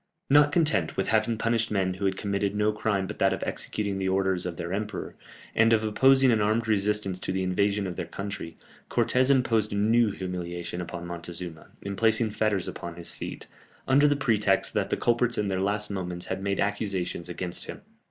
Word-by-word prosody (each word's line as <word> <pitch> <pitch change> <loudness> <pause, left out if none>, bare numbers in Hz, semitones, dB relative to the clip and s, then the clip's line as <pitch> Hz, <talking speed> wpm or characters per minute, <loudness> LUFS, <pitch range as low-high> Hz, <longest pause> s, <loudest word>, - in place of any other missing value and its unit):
Not 145 0 +6
content 145 - +1
with 95 - 0
having 110 +1 +2
punished 115 0 +1
men 95 -3 0
who 95 +2 -4
had 95 -1 0
committed 100 0 -1
no 105 +1 +2
crime 105 -2 -1
but - - -7
that - - +3
of - - -4
executing 100 -2 -3
the 95 0 0
orders 95 -1 +1
of 85 -2 -6
their 85 +2 -4
emperor, 105 +1 -4 0.4
and 115 0 +4
of 110 -1 +3
opposing 130 +4 +5
an 110 -2 +2
armed 110 +3 +1
resistance 105 -2 0
to - - -3
the 95 0 -1
invasion 100 +2 +1
of 90 -2 -5
their 85 - -4
country, 100 -3 -6 0.3
Cortès 130 +1 +2
imposed 115 -6 +2
a - - -1
new 110 +2 +3
humiliation 90 -2 -5
upon 85 0 -6
Montezuma, 85 -1 -6 0.2
in 100 0 -4
placing 110 +1 +2
fetters 105 -4 +1
upon 85 -1 -6
his 85 -1 -6
feet, - - -7 0.4
under 140 +2 +5
the 145 - +3
pretext 105 -8 +1
that - - 0
the - - 0
culprits 120 0 +1
in 105 -1 0
their 95 -1 -1
last 105 +1 +1
moments 90 -2 -4
had 95 0 -4
made 100 0 -1
accusations 95 -4 -2
against 90 0 -5
him. - - -8
100 Hz, 200 wpm, -27 LUFS, 90-110 Hz, 0.4 s, Not